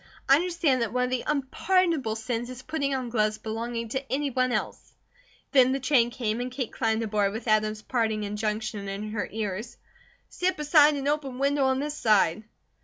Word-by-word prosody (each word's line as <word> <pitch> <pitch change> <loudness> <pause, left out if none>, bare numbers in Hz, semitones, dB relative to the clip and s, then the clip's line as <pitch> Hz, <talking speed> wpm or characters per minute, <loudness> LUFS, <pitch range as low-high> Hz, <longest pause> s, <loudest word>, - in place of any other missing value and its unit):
I 275 - +7
understand 335 -6 +1
that 230 -3 -1
one 250 +1 +1
of 250 - 0
the 255 -1 -1
unpardonable 300 -2 +1
sins 230 +2 -3
is 255 0 -9
putting 280 -2 -1
on 255 -2 -3
gloves 215 -2 +1
belonging 230 +1 -4
to 265 +3 -4
any 280 +1 0
one 255 0 +1
else." - - -3 0.6
Then 260 -2 +5
the 270 - -1
train 255 -3 +3
came 235 -2 -2
and 250 +1 -4
Kate 255 -2 -4
climbed 225 0 0
aboard 205 -2 0
with 225 +2 -6
Adam's 215 0 +1
parting 220 -4 0
injunction 210 0 -3
in 205 +2 -5
her 215 -1 -3
ears: 215 +1 -4 0.5
"Sit 365 +1 -1
beside 300 0 +5
an 280 0 -3
open 290 -4 -1
window 280 +1 +2
on 265 0 +2
this 295 +1 -2
side!" 215 - +2
245 Hz, 185 wpm, -27 LUFS, 220-275 Hz, 0.6 s, I